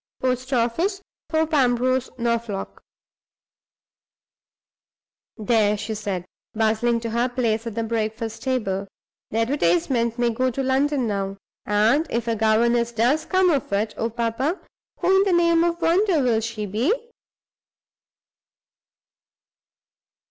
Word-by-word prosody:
Post 255 +1 -1
office, 270 - 0 0.3
Thorpe 320 0 0
Ambrose, 255 -1 +2
Norfolk_." 235 -4 -2 2.6
"There!" 210 -1 +2
she 215 +2 -4
said, 200 -4 -4 0.3
bustling 225 +2 +1
to 230 -1 -4
her 240 +2 +1
place 230 -2 -1
at 225 - -5
the 230 - -1
breakfast 225 0 -3
table. 200 -7 -1 0.4
"The 220 - -3
advertisement 230 - +1
may 240 -1 +2
go 255 +3 0
to 270 +2 -3
London 265 0 +1
now; 195 -2 -2 0.3
and, 220 +10 +3
if 235 0 -2
a 230 - +1
governess 235 +2 +2
does 245 +7 +1
come 370 -1 +3
of 280 -8 -1
it, 210 +2 0
oh, 225 - -2
papa, 235 - -1 0.4
who 380 +1 +4
in 385 - +5
the 390 -2 +1
name 335 -1 +4
of 340 0 -1
wonder 355 0 +3
will 230 -3 +2
she 225 -1 -4
be? 220 - 0
235 Hz, 125 wpm, -23 LUFS, 220-270 Hz, 2.6 s, in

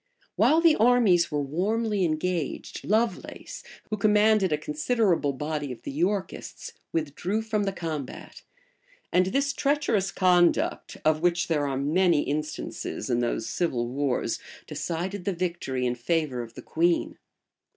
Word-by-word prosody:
While 320 +2 +4
the 330 -2 +6
armies 215 -7 +4
were 145 -2 -1
warmly 205 +7 0
engaged, 165 0 -2
Lovelace, 220 +3 -1 0.3
who 215 - 0
commanded 210 -2 +4
a 150 - +2
considerable 160 - +1
body 150 0 -3
of 125 - -9
the - - -5
Yorkists, 185 +7 -3 0.2
withdrew 165 +7 -2
from 215 -2 -1
the 195 - 0
combat; 155 -7 -6 0.7
and 185 +1 +4
this 275 +6 0
treacherous 275 -10 +1
conduct, 180 -2 +2
of 155 0 +3
which 175 0 +1
there 150 -3 +1
are 135 -1 -2
many 160 +3 +3
instances 150 -2 -4
in 120 - +2
those 120 -2 -1
civil 125 -9 -1
wars, 135 0 -1 0.3
decided 180 +3 -4
the 195 - -1
victory 170 -8 -2
in 120 - +1
favor 130 0 -1
of 115 -1 -10
the - - -9
queen. 170 +1 0
175 Hz, 140 wpm, -26 LUFS, 150-205 Hz, 0.7 s, the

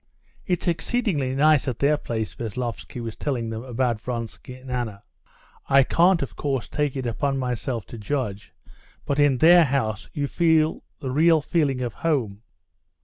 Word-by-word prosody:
"It's 180 -1 -1
exceedingly 170 - 0
nice 150 0 +4
at 125 - -2
their 145 +2 +3
place," 110 -6 -4
Veslovsky 120 +1 -5
was 115 -2 -5
telling 120 -6 -2
them 110 0 -4
about 125 -3 -1
Vronsky 120 +1 -6
and 130 0 -10
Anna. 110 -5 -3 0.7
"I 135 0 +6
can't, 170 +3 +3
of 105 -9 -7
course, 135 -7 -2
take 145 -2 -1
it 130 -2 -3
upon 135 +4 -1
myself 125 -3 -3
to 115 - -10
judge, 105 -4 -3 0.5
but 140 0 -1
in 145 -3 +4
their 170 +5 +7
house 130 -8 -1
you 145 - -2
feel 160 0 +2 0.2
the 130 - -3
real 160 +4 +4
feeling 145 -4 0
of 120 -3 -3
home." 120 -11 -1
130 Hz, 160 wpm, -24 LUFS, 115-150 Hz, 0.7 s, their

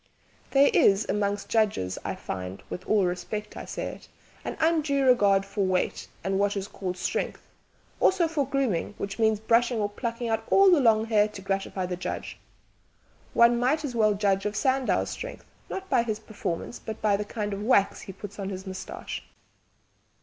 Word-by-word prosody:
"There 275 +1 +5
is 200 +1 +4
among 205 0 0
judges, 205 - +1
I - - -3
find 95 0 -6
with 180 - -6
all 205 -3 +3
respect 180 +4 -4
I - - -6
say - - -5
it - - -11 0.4
an - - -5
undue 310 -4 +2
regard 200 -6 +4
for 200 0 -2
weight 185 -1 0 0.2
and 195 0 0
what 205 0 +1
is 195 0 -3
called 185 -3 -5
strength, 185 - -3 0.5
also 370 -3 +4
for 300 -4 -1
grooming, 255 -9 -1
which 200 +2 -5
means 220 -2 +3
brushing 230 +2 +2
or 205 - +1
plucking 235 +2 -4
out 225 0 0
all 390 -1 +6
the 345 - +6
long 220 -3 +4
hair 215 -2 +3
to 210 -2 -10
gratify 195 -1 -2
the 180 0 -3
judge. 180 - -5 1.0
One 235 0 +6
might 295 +5 +1
as 265 - -4
well 215 -3 +3
judge 200 0 +1
of 210 - -4
Sandow's 260 +3 +1
strength, - - -7 0.2
not 385 0 -5
by 240 - +3
his 220 -2 -2
performances, 215 -2 -5
but 220 -1 -6
by 210 -2 +3
the 205 - -1
kind 210 -1 -4
of 200 - -4
wax 210 -3 +3
he - - -8
puts 205 +2 -10
on 195 -1 -3
his 190 0 -6
moustache! 190 -1 -6
210 Hz, 185 wpm, -27 LUFS, 195-240 Hz, 1.0 s, all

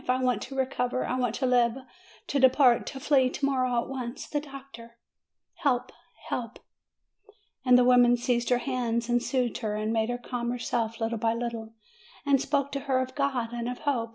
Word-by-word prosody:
I 255 0 +3
want 250 -4 +1
to 270 - -8
recover; 255 -1 -1
I 250 - -2
want 245 -3 0
to 265 - -1
live, 245 -1 +3 0.5
to 280 - -1
depart, 260 -2 +5
to 270 - -6
flee, 265 -2 +3
to 275 - -2
morrow, 255 -3 +1
at - - -10
once! 255 -2 -5
The 295 - -1
doctor! 275 -5 -11 0.6
Help! 265 -7 0 0.4
help 235 -1 -4 0.6
!" 420 - -30
And 250 -1 +6
the 250 - +5
\vomen 245 -1 +5
seized 240 0 0
her 245 - +4
hands 240 -3 -1
an'd 240 0 +2
soothed 250 -3 -1
her, 215 -3 -2
and 215 +1 -1
made 220 0 +1
her 245 - -1
calm 245 -1 -4
herself 230 -2 -2
little 225 0 -2
by 225 +1 +1
little, 230 -2 -5 0.5
and 275 -2 +3
spoke 280 -1 0
to 275 - -2
her 260 - +3
of 260 0 -3
God 260 -5 -1
and 240 0 -3
of 250 - -5
hope. 245 -6 -1
250 Hz, 200 wpm, -27 LUFS, 235-265 Hz, 0.6 s, And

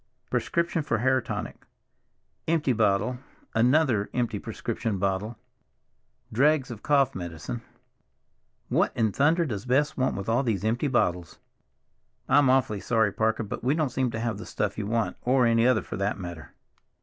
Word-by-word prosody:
Prescription 170 -1 0
for 130 -6 -1
hair 130 +3 +2
tonic; - - -6 0.8
empty 155 -5 +2
bottle—another 120 +3 +1
empty 120 -4 -1
prescription 115 -1 -3
bottle—dregs 120 +6 -3
of 110 -3 -8
cough 140 -3 +3
medicine. 85 +5 -6 1.1
What - - +1
in 110 -3 +2
thunder 160 - +2
does 110 -4 -5
Bess 145 +4 +2
want 130 0 0
with 100 - -5
all 115 +3 +2
these 110 -7 -1
empty 120 +6 +1
bottles? 90 - 0 0.9
I'm 145 -3 +5
awfully 130 -6 +2
sorry, 110 -1 +1
Parker, 110 +1 0
but 105 - -6
we 135 +4 +2
don't 155 -5 0
seem 130 0 0
to 115 - -4
have 115 -3 -2
the - - -7
stuff 105 -1 -2
you 105 -2 -4
want, 115 +1 -1
or 125 0 +3
any 115 0 +4
other, 125 -4 +3
for - - -6
that 100 +1 -1
matter." 85 -4 -8
115 Hz, 150 wpm, -26 LUFS, 105-130 Hz, 1.1 s, I'm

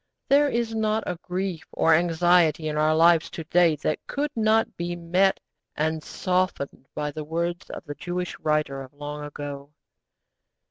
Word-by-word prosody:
There 285 +1 +5
is 235 -2 -1
not 220 0 0
a 175 - -4
grief 180 -2 -3
or 165 - +4
anxiety 165 -1 +3
in 150 - -2
our 155 +1 +3
lives 165 0 +5
to 165 - -6
day 170 0 +4
that 155 - 0
could 290 +1 -2
not 220 0 +2
be 175 0 -3
met 180 +3 +2 0.4
and 160 +1 0
softened 180 -8 -2
by 150 0 -2
the 155 +1 -5
words 170 +3 -3
of - - -8
the 145 - -5
Jewish 180 +3 -4
writer 150 -3 0
of 130 0 -11
long 145 0 -6
ago. 145 -1 -7
170 Hz, 160 wpm, -25 LUFS, 150-185 Hz, 0.4 s, There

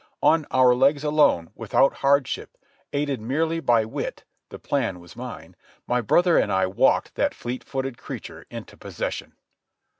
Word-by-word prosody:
On 160 -2 +4
our 130 -1 +5
legs 140 +3 +3
alone, 150 - +2
without 135 - +1
hardship, 140 -1 0 0.3
aided 140 -4 -1
merely 160 +8 0
by 120 -8 +3
wit—the 110 - -7
plan 120 -10 -2
was 85 0 -15
mine—my 125 0 -6
brother 175 - +4
and - - 0
I 95 0 +2
walked 95 +1 +2
that - - 0
fleet 125 +1 -5
footed 135 -2 -4
creature - - -9
into - - -9
possession. - - -5
135 Hz, 140 wpm, -24 LUFS, 120-145 Hz, 0.3 s, our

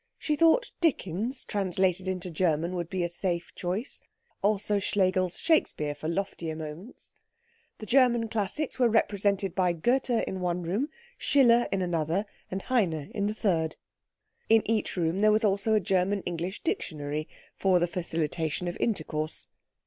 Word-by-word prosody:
She 305 -1 -1
thought 330 +11 +4
Dickens 245 - 0
translated 190 -2 0
into 185 -1 -3
German 165 0 +1
would 175 -2 -3
be 185 -2 -1
a - - +1
safe 175 0 -2
choice; 185 +8 -2 0.4
also 205 0 +1
Schlegel's 185 -2 +1
Shakespeare 155 - +1
for 155 - -6
loftier 170 -3 -3
moments. 160 +8 -8 0.6
The 215 - -8
German 240 -1 +4
classics 225 +7 -2
were 245 -2 +5
represented 200 -3 +1
by 180 -2 +2
Goethe 240 +7 +1
in 190 - -3
one 180 0 -1
room, 205 - -1 0.3
Schiller 240 -4 +4
in 195 -1 0
another, 170 +3 0 0.2
and 190 +1 -4
Heine 175 - 0
in 205 -1 0
the 210 - -2
third. 165 -7 0 0.7
In 225 0 +6
each 220 -3 0
room 165 0 +1
also - - -1
there 215 0 +6 0.2
was 200 +2 -1
a 220 -1 +4
German 190 +1 +1
English 175 +2 -4
dictionary, 155 - -2 0.3
for 190 -2 +3
the 175 - +3
facilitation 165 -1 -2
of 175 - -3
intercourse. 155 -7 -1
190 Hz, 150 wpm, -28 LUFS, 170-215 Hz, 0.7 s, In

